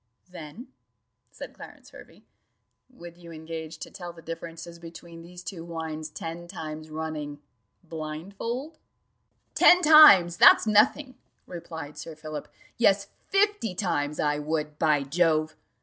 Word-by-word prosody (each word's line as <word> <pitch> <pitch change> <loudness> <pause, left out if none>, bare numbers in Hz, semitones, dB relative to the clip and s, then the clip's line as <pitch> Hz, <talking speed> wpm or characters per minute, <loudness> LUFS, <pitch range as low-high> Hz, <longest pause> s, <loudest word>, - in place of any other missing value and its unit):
"Then," 180 - -10 0.6
said - - -10
Clarence - - -14
Hervey, - - -16 0.7
"would 175 -9 -13
you 170 -1 -12
engage 160 0 -8
to - - -9
tell 175 -2 -8
the 165 -1 -16
differences 165 +1 -8
between 165 0 -12
these 175 +1 -12
two 170 -1 -7
wines 160 -2 -6
ten 165 +3 -7
times 155 -3 -8
running, 155 -2 -5 0.4
blind 160 +2 -7
fold?" 265 +9 -5 0.7
"Ten 360 0 +6
times! 300 - +8
that's - - +7
nothing," 255 +6 +2 0.3
replied 160 -4 -9
Sir 160 - -8
Philip: 155 0 -7 0.3
"yes, 200 -4 +3 0.2
fifty 400 - +1
times, 150 -6 -2
I 150 0 0
would, 150 0 -3
by 150 -3 +2
Jove!" 155 +1 +1
165 Hz, 130 wpm, -26 LUFS, 155-185 Hz, 0.7 s, times